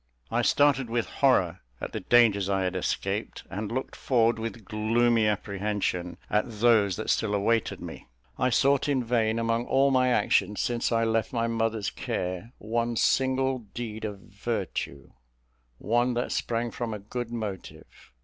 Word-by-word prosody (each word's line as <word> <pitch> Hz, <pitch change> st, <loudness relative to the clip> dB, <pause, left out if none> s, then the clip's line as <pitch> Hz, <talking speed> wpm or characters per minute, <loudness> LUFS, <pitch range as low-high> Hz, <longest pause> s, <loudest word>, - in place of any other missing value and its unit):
I 120 Hz, +1 st, +2 dB
started 135 Hz, 0 st, +3 dB
with 115 Hz, 0 st, 0 dB, 0.2 s
horror 95 Hz, -10 st, +3 dB, 0.2 s
at -, -, -5 dB
the -, -, -3 dB
dangers 105 Hz, -5 st, +4 dB
I 95 Hz, -1 st, +1 dB
had 90 Hz, 0 st, -1 dB
escaped, 90 Hz, -, -2 dB
and 105 Hz, +2 st, -4 dB
looked 130 Hz, +2 st, -3 dB
forward 120 Hz, -5 st, +2 dB
with 115 Hz, -1 st, -5 dB
gloomy 115 Hz, +2 st, +2 dB
apprehension 100 Hz, -3 st, -2 dB
at 105 Hz, 0 st, -1 dB
those 110 Hz, -5 st, +4 dB
that 110 Hz, -, -1 dB
still 105 Hz, -2 st, +1 dB
awaited 110 Hz, +3 st, +1 dB
me. -, -, -9 dB, 0.3 s
I 125 Hz, -, +3 dB
sought 140 Hz, +3 st, +3 dB
in 135 Hz, -3 st, +1 dB
vain, 115 Hz, -2 st, +1 dB
among 115 Hz, +1 st, 0 dB
all 135 Hz, +1 st, +3 dB
my 130 Hz, -1 st, +3 dB
actions 105 Hz, -4 st, +2 dB
since 120 Hz, 0 st, 0 dB
I 115 Hz, 0 st, +2 dB
left 115 Hz, 0 st, 0 dB
my 115 Hz, -1 st, +1 dB
mother's 115 Hz, -4 st, -1 dB
care, 90 Hz, +5 st, -4 dB
one 115 Hz, +2 st, -1 dB
single 130 Hz, +2 st, +2 dB, 0.2 s
deed 110 Hz, -2 st, -5 dB
of 105 Hz, -2 st, -4 dB
virtue 100 Hz, -, -4 dB, 0.7 s
one 120 Hz, -, +1 dB
that 120 Hz, -, -1 dB
sprang 115 Hz, 0 st, -1 dB
from 115 Hz, -2 st, -4 dB
a -, -, -4 dB
good 120 Hz, +4 st, -5 dB
motive. 110 Hz, -5 st, -7 dB
115 Hz, 160 wpm, -27 LUFS, 105-120 Hz, 0.7 s, dangers